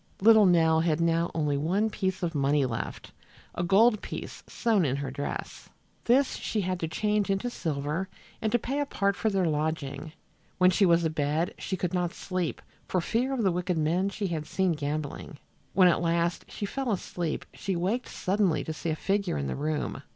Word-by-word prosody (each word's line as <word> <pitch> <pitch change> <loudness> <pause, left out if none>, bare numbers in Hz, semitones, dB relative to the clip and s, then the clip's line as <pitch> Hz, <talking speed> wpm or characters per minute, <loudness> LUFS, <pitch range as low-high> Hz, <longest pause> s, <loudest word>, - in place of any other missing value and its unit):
Little 220 0 +7
Nell 160 -2 +4
had 160 -1 +1
now 170 0 +2
only 150 -3 +1
one 190 +9 +1
piece 190 -2 -2
of 170 -1 -1
money 140 -1 +2
left, 115 -3 -5 0.4
a - - -3
gold 210 +5 +4
piece - - -7
sewed 220 -5 +1
in 135 -3 +1
her 140 -1 -4
dress. 140 +1 -5 0.4
This 260 +3 +3
she 215 - -2
had 185 -1 -2
to 165 - -2
change 210 +5 0
into 195 +5 0
silver 155 +1 -2 0.3
and 220 - 0
to 240 - +4
pay 270 +5 -3
a 290 - 0
part 200 -6 0
for 220 - 0
their 195 -3 +1
lodging. 155 -1 -2 0.4
When 185 0 +5
she 195 +1 +4
was 170 0 +4
abed 155 +2 0
she 190 - -3
could 180 -1 -2
not 180 -1 -1
sleep 185 -4 -3 0.2
for 185 - +1
fear 230 +9 0
of 260 -4 -1
the 190 - +3
wicked 180 0 -1
men 170 +5 +1
she 200 +1 -4
had 160 -5 -3
seen 190 +2 +1
gambling. 150 -1 -4 0.4
When 185 -2 +6
at 175 - +3
last 170 0 0
she 205 - -4
fell 265 +3 -2
asleep 175 -4 -3
she 195 - -3
waked 195 +9 -1
suddenly 190 -3 +1
to 160 - -4
see 165 - -4
a 155 - 0
figure 195 - 0
in 70 - -2
the 70 - -2
room. 150 +1 -2
175 Hz, 195 wpm, -28 LUFS, 155-200 Hz, 0.4 s, Little